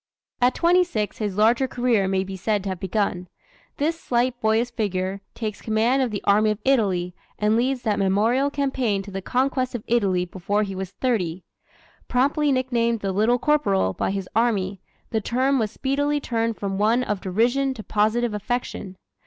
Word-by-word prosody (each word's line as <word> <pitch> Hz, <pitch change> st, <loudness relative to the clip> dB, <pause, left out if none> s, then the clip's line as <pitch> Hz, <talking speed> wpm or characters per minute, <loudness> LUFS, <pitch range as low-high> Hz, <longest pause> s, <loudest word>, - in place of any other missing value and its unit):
At 245 Hz, +1 st, +3 dB
twenty 355 Hz, +2 st, +4 dB
six 215 Hz, -, -3 dB
his 205 Hz, -3 st, -2 dB
larger 235 Hz, +5 st, +4 dB
career 240 Hz, -6 st, +1 dB
may 190 Hz, 0 st, +1 dB
be 195 Hz, 0 st, -7 dB
said 205 Hz, +1 st, -1 dB
to 200 Hz, -, -3 dB
have 185 Hz, -2 st, -4 dB
begun. 190 Hz, -2 st, -1 dB, 0.5 s
This 325 Hz, +3 st, -1 dB
slight 245 Hz, 0 st, 0 dB
boyish 220 Hz, +2 st, +2 dB
figure 195 Hz, -3 st, -2 dB
takes 215 Hz, -3 st, -4 dB
command 230 Hz, +5 st, +2 dB
of 255 Hz, -, +1 dB
the 205 Hz, -2 st, -5 dB
Army 215 Hz, +2 st, +4 dB
of 215 Hz, -, 0 dB
Italy 195 Hz, -9 st, +1 dB, 0.2 s
and 210 Hz, +1 st, +2 dB
leads 250 Hz, +2 st, 0 dB
that 215 Hz, -3 st, 0 dB
memorable 220 Hz, +8 st, +2 dB
campaign 265 Hz, -8 st, -1 dB
to 200 Hz, -, -10 dB
the 195 Hz, 0 st, -4 dB
conquest 255 Hz, +3 st, 0 dB
of 225 Hz, -, -4 dB
Italy 195 Hz, -6 st, +1 dB
before 195 Hz, +4 st, -1 dB
he 195 Hz, -2 st, -4 dB
was 190 Hz, -1 st, -5 dB
thirty. 185 Hz, -7 st, -1 dB, 0.6 s
Promptly 285 Hz, +4 st, +2 dB
nicknamed 235 Hz, -3 st, 0 dB
"The 195 Hz, -, -1 dB
Little 220 Hz, +6 st, +2 dB
Corporal" 220 Hz, -, +1 dB
by -, -, -1 dB
his 195 Hz, -1 st, -3 dB
army, 200 Hz, -5 st, +1 dB, 0.3 s
the 220 Hz, -, 0 dB
term 260 Hz, +5 st, +1 dB
was 220 Hz, -2 st, 0 dB
speedily 285 Hz, +5 st, 0 dB
turned 230 Hz, -4 st, -1 dB
from 195 Hz, -1 st, -3 dB
one 225 Hz, +4 st, +3 dB
of 210 Hz, -5 st, -2 dB
derision 245 Hz, +8 st, +1 dB
to 215 Hz, -, -8 dB
positive 220 Hz, +3 st, +1 dB
affection. 210 Hz, -3 st, -4 dB
220 Hz, 180 wpm, -23 LUFS, 195-250 Hz, 0.6 s, twenty